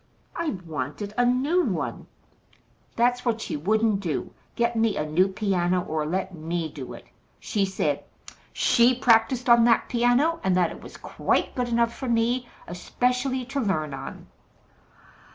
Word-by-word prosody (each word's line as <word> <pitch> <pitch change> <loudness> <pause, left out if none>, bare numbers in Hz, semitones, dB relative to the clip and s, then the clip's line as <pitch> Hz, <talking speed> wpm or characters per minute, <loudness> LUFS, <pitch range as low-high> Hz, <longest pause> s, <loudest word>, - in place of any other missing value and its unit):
I 330 - -2
wanted 160 +7 -5
a 245 - +3
new 275 +9 +2
one. - - -3 0.9
That's 245 +1 +2
what 230 -2 0
she - - -4
wouldn't 215 +6 +1
do 170 -7 -3 0.2
get 235 0 0
me 225 -1 +1
a 150 - -1
new 165 +5 +3
piano, 185 -3 0
or 155 -1 -2
let 185 +3 -2
me 165 -1 -3
do 135 -4 -8
it. - - -12 0.3
She 200 -2 0
said 190 - -1 0.5
SHE 240 +2 +4
practised 240 +1 +3
on 235 -1 +7
that 230 -1 +3
piano, 245 +8 +2
and 185 -1 +2
that 175 -2 +2
it - - -10
was - - -11
quite - - -1
good 250 -1 -1
enough 235 0 +1
for 260 - -5
me, 235 +2 +1 0.2
especially 250 +8 -1
to 270 +3 -3
learn 155 - -1
on. 135 0 -8
225 Hz, 155 wpm, -25 LUFS, 180-245 Hz, 0.9 s, on